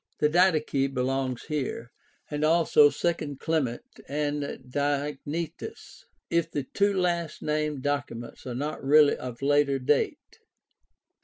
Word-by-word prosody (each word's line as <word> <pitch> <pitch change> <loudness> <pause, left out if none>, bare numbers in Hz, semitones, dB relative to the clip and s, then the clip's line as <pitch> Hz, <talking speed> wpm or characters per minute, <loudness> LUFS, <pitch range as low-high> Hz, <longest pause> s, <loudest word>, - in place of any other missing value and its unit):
The 150 - +3
Didache 155 -5 +2
belongs 130 -1 -1
here, 130 -5 -4 0.4
and 150 0 -2
also 155 -2 +5
II 155 -3 -2
Clement 135 -5 -1 0.2
and 145 +1 -1 0.3
Diognetus 145 +3 -3
— - - -49
if 170 -1 +1
the 145 -3 -2
two 200 +8 +1
last 170 -3 -1
named 150 -2 -1
documents 140 -5 -3
are 125 - -4
not 145 +4 -4
really 145 +1 +6
of 125 0 -7
later 145 -1 +3
date. 135 +2 -1
145 Hz, 125 wpm, -27 LUFS, 135-155 Hz, 0.4 s, really